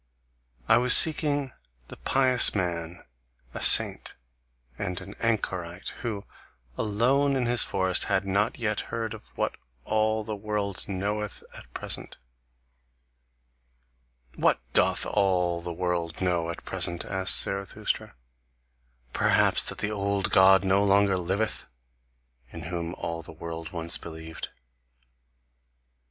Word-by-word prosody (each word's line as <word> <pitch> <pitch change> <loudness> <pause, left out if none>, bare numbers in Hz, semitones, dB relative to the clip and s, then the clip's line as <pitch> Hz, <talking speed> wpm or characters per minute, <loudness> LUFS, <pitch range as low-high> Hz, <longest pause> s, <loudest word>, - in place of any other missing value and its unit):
I - - +5
was 125 0 +8
seeking 145 -4 +4 0.4
the - - -9
pious 130 -4 +3
man, 85 -3 -4 0.5
a - - -6
saint - - +4 0.6
and 90 0 -3
an 95 +1 -10
anchorite, 95 -6 -2
who, 105 -4 -4 0.5
alone 130 - +1
in 130 -2 0
his 120 -1 +2
forest, 95 -1 0
had 95 - 0
not 100 +3 0
yet 110 -3 -1
heard 115 -1 -4
of - - -12
what - - -2 0.3
all 110 0 0
the 105 0 -5
world 100 -2 -3
knoweth 105 +2 -4
at - - -12
present." - - -4 2.2
"WHAT - - +2
doth - - +3
all 90 -4 0
the 85 - -6
world 85 -2 -3
know 85 -3 -1
at 85 - -7
present?" 85 0 -2
asked 95 -2 +3
Zarathustra. 100 0 -4 1.0
"Perhaps - - +3
that - - -8
the 105 - -2
old 100 -1 -1
God 95 0 +6
no 95 +1 +3
longer 100 -1 +3
liveth, 95 +5 -2 0.8
in 85 - -9
whom 85 +1 -5
all 85 0 -5
the - - -10
world 80 0 -7
once 85 -1 -2
believed?" 80 -1 -8
95 Hz, 120 wpm, -26 LUFS, 85-110 Hz, 2.2 s, was